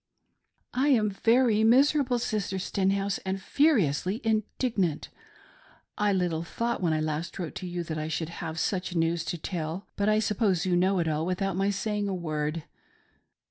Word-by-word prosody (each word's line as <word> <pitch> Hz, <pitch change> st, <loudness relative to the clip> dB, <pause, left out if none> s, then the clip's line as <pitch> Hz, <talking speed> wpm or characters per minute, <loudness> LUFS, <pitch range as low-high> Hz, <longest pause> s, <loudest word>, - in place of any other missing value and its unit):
I 260 Hz, +3 st, +1 dB
am 220 Hz, -7 st, +3 dB
very 225 Hz, +2 st, +3 dB
miserable, 260 Hz, +2 st, +4 dB
Sister 210 Hz, -4 st, -2 dB
Stenhouse, 195 Hz, +1 st, 0 dB
and 190 Hz, 0 st, -3 dB
furiously 200 Hz, -, +2 dB
indig 225 Hz, +2 st, -1 dB
nant. 165 Hz, -5 st, 0 dB, 0.9 s
I 210 Hz, 0 st, +1 dB
little 175 Hz, -4 st, 0 dB
thought 235 Hz, +8 st, -2 dB
when 170 Hz, -3 st, +2 dB
I 155 Hz, -, +1 dB
last 155 Hz, +2 st, -3 dB
wrote 170 Hz, -4 st, -4 dB
to 185 Hz, -, -5 dB
you 175 Hz, 0 st, -3 dB
that 160 Hz, -2 st, -4 dB
I 155 Hz, -, -3 dB
should 160 Hz, 0 st, -3 dB
have 160 Hz, -1 st, -4 dB
such 180 Hz, 0 st, -1 dB
news 165 Hz, 0 st, +1 dB
to 175 Hz, -, -3 dB
tell; 170 Hz, +2 st, -4 dB
but 205 Hz, +1 st, +1 dB
I 215 Hz, -, +4 dB
suppose 205 Hz, -4 st, +1 dB
you 180 Hz, -1 st, +2 dB
know 185 Hz, +2 st, +3 dB
it 170 Hz, -2 st, 0 dB
all 155 Hz, 0 st, 0 dB
without 185 Hz, +1 st, -1 dB
my 195 Hz, +2 st, +1 dB
saying 205 Hz, +1 st, -1 dB
a 195 Hz, -, -1 dB
word. 155 Hz, -2 st, -2 dB
190 Hz, 175 wpm, -28 LUFS, 165-215 Hz, 0.9 s, miserable